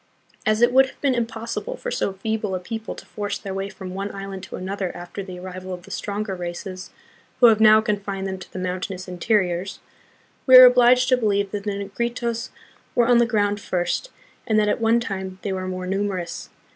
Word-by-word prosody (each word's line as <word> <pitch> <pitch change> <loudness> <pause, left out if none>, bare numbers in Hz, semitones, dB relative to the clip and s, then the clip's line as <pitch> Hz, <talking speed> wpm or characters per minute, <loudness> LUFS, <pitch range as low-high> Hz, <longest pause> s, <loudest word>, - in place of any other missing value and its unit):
As 215 +2 +3
it 240 - +4
would 265 +1 +6
have - - -15
been 275 -2 +2
impossible 235 - -3
for - - -5
so 195 - -1
feeble 210 0 -2
a - - -2
people 225 +4 -6
to - - -11
force 205 -1 -4
their 195 - -6
way 195 +1 -3
from 185 -2 -8
one 195 +2 -3
island 195 -1 -6
to - - -8
another 190 0 -3
after 175 +3 -7
the 185 -2 -8
arrival 185 0 -6
of 175 - -14
the - - -13
stronger 205 0 -3
races, 185 +1 -6 0.5
who 250 - +7
have 220 -1 +3
now 215 0 +7
confined 200 -2 -2
them 190 -1 -4
to 180 - -12
the - - -8
mountainous 185 +1 -4
interiors, 185 0 0 0.7
we 260 - +8
are 255 0 +13
obliged 250 0 +6
to 255 - +5
believe 200 -4 0
that 205 -1 -4
the - - 0
Negritos 235 +4 -3 0.5
were 240 - +4
on 240 0 +5
the 235 - +4
ground 205 -3 0
first, 180 - -2 0.4
and 220 - +2
that 210 - +2
at - - 0
one 225 +1 +4
time 190 -4 -5
they 200 - -2
were 185 0 -3
more 185 0 -4
numerous. 190 -2 -3
200 Hz, 210 wpm, -23 LUFS, 185-230 Hz, 0.7 s, are